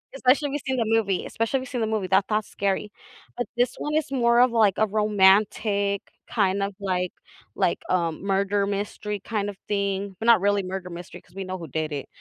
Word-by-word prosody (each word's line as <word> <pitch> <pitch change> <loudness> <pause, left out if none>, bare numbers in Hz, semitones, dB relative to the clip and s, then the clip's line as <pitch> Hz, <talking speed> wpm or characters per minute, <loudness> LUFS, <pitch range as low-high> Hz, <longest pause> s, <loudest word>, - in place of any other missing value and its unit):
especially 270 +3 +3
if - - -6
you've 290 - -3
seen 260 - 0
the 230 - +1
movie 215 -4 +1
especially 230 +4 -1
if - - -6
you've 260 - -9
seen 245 -3 -3
the 220 - +1
movie, 215 -3 -1
that 200 - +3
that's 215 0 0
scary. 200 +1 -1 0.5
But 245 - -2
this 245 0 +2
1 300 +1 -3
is 310 -3 0
more 235 -2 +3
of, 250 -1 +5
like, 215 -5 +4
a 220 - +4
romantic 200 0 +3 0.3
kind 200 -2 +1
of, 200 0 -2
like 180 -2 -1 0.4
like, - - +1
um, 170 -1 0
murder 200 +1 +1
mystery 205 +1 -3
kind 205 -2 -2
of 195 - -8
thing, 200 -1 -1
but, 225 - -3
not 235 -3 +7
really 205 0 +2
murder 185 0 -5
mystery 175 0 -9
‘cause - - -25
we 195 - -4
know 185 0 -4
who 165 -3 -8
did 155 +2 -3
it. 140 - -4
205 Hz, 220 wpm, -25 LUFS, 190-225 Hz, 0.5 s, not